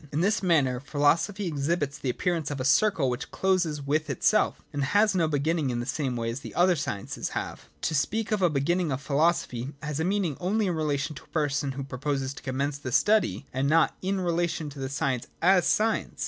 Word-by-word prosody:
In 150 - 0
this 205 +4 +2
manner 145 -9 +2
philosophy 155 +9 +1
ex 145 -4 -2
hibits 145 -4 -1
the 130 - -1
appearance 165 +4 -1
of 145 -2 -4
a 130 - -2
circle 165 -2 +3
which 125 -1 -3
closes 175 -6 0
with 150 +2 0
itself, 135 - +2
and 145 -1 -1
has 205 +8 +3
no 170 -4 +2
beginning 155 0 0
in 120 -1 -1
the 120 - -3
same 130 0 -2
way 115 -1 -2
as 120 - -5
the - - -10
other 180 +1 +4
sciences 135 -10 -4
have. - - -6
To - - 0
speak 220 +10 0
of 210 -2 +1
a 180 - +4
beginning 160 +3 0
of 130 - -1
philo 150 +4 +3
sophy 130 -4 -5
has 150 0 -3
a - - +1
meaning 185 -5 0
only 205 +4 0
in 180 - 0
relation 150 -2 -1
to - - -11
a - - -24
person 145 -3 -1
who 135 +1 -5
proposes 135 0 -3
to - - -11
commence 140 +2 -2
the 130 -3 -5
study, 210 - +2
and 135 +2 0
not 165 +1 +3
in 190 +1 -1
relation 170 -3 -1
to 140 - -10
the 135 0 -3
science 130 -2 -1
as 185 +1 +4
science. 220 +1 +1
150 Hz, 220 wpm, -27 LUFS, 135-175 Hz, -, other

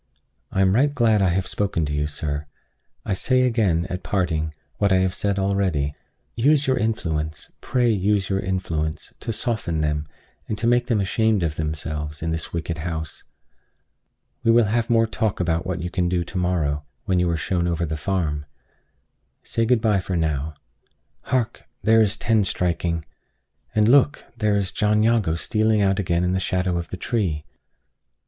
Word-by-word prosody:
I 95 - +1
am 95 0 +4
right 140 +6 +3
glad 115 -7 +3
I 95 - +4
have 95 +2 0
spoken 95 -6 -1
to 75 - -3
you, 75 0 0
sir. 75 0 -4 0.6
I - - 0
say 130 +7 +2
again, 105 -9 +2
at 90 +1 -4
parting, 80 -6 -1 0.2
what 100 -1 +2
I - - +5
have 95 0 +1
said 100 -1 -1
already: 95 -7 0 0.4
Use 145 +4 +3
your 130 - +2
influence, 80 - -2
pray 120 -2 +2
use 100 -1 +1
your 95 -1 0
influence, 85 -4 -3
to 115 - -3
soften 110 -9 -1
them, 75 0 -1 0.4
and 105 - -3
to 105 - -2
make 120 +1 +3
them 115 -4 +2
ashamed 105 0 +1
of 80 -2 -1
themselves, 75 -1 -4
in 80 - -1
this 80 -1 -2
wicked 85 -1 -3
house. 80 -2 -5 1.2
We 115 - +2
will 115 0 +6
have 115 +3 0
more 115 -1 +4
talk 110 -2 -1
about 85 0 0
what 90 -2 -2
you 90 - -4
can 90 -2 0
do 90 -1 +1
to 95 - -7
morrow, 80 -5 0 0.2
when 95 -3 +2
you 90 -1 +2
are 85 - 0
shown 85 +2 -1
over 85 0 0
the 80 0 -3
farm. 75 -3 -2 1.0
Say 115 0 0
good 120 -2 +3
by 105 -4 +2
now. 80 -4 -1 0.7
Hark! 120 -3 -1 0.2
there 115 0 +5
is 110 0 +3
ten 110 -2 +2
striking! 85 -3 -1 0.7
And 105 0 +4
look! 140 +4 +4 0.2
here 105 -1 +3
is 100 -2 0
John 105 0 +2
Jago 110 -8 +2
stealing 110 +4 +1
out 95 0 +2
again 85 -2 +1
in 90 0 +1
the 95 - +1
shadow 90 -1 0
of 85 - -6
the 95 - -5
tree! 90 -9 -1
95 Hz, 180 wpm, -23 LUFS, 80-110 Hz, 1.2 s, will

